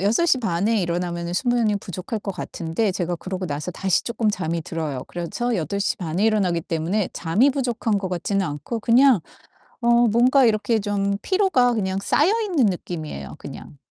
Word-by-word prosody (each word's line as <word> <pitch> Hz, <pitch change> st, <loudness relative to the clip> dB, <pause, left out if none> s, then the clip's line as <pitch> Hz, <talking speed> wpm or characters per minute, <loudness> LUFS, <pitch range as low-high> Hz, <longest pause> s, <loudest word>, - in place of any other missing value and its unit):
6:30에 220 Hz, -, +2 dB
일어나면은 170 Hz, 0 st, -2 dB
수면이 235 Hz, -2 st, +1 dB
부족할 190 Hz, +3 st, -5 dB
것 195 Hz, -, -4 dB
같은데 170 Hz, +3 st, -2 dB
제가 175 Hz, -1 st, -2 dB
그러고 185 Hz, +1 st, -5 dB
나서 145 Hz, +3 st, -4 dB
다시 190 Hz, +1 st, 0 dB
쪼끔 230 Hz, -2 st, 0 dB
잠이 170 Hz, -4 st, -2 dB
들어요. 150 Hz, -6 st, -4 dB
그래서 205 Hz, +8 st, -3 dB
8:30 180 Hz, -1 st, -2 dB
에 205 Hz, -, +2 dB
일어나기 195 Hz, -6 st, +2 dB
때문에 170 Hz, +5 st, -1 dB
잠이 195 Hz, +12 st, +2 dB
부족한 240 Hz, -6 st, -1 dB
것 190 Hz, -, -3 dB
같지는 190 Hz, +2 st, -1 dB
않고 150 Hz, +10 st, -4 dB
그냥 245 Hz, -2 st, +5 dB, 0.6 s
어 235 Hz, -, -1 dB, 0.2 s
뭔가 250 Hz, +4 st, +4 dB
이렇게 220 Hz, +1 st, +2 dB
좀 200 Hz, -1 st, -1 dB
피로가 375 Hz, -12 st, +2 dB
그냥 190 Hz, -3 st, -1 dB
쌓여있는 350 Hz, -, +2 dB
느낌이에요, 160 Hz, -, -5 dB
그냥. 70 Hz, -, -10 dB
200 Hz, 340 characters per minute, -23 LUFS, 170-235 Hz, 0.6 s, 그냥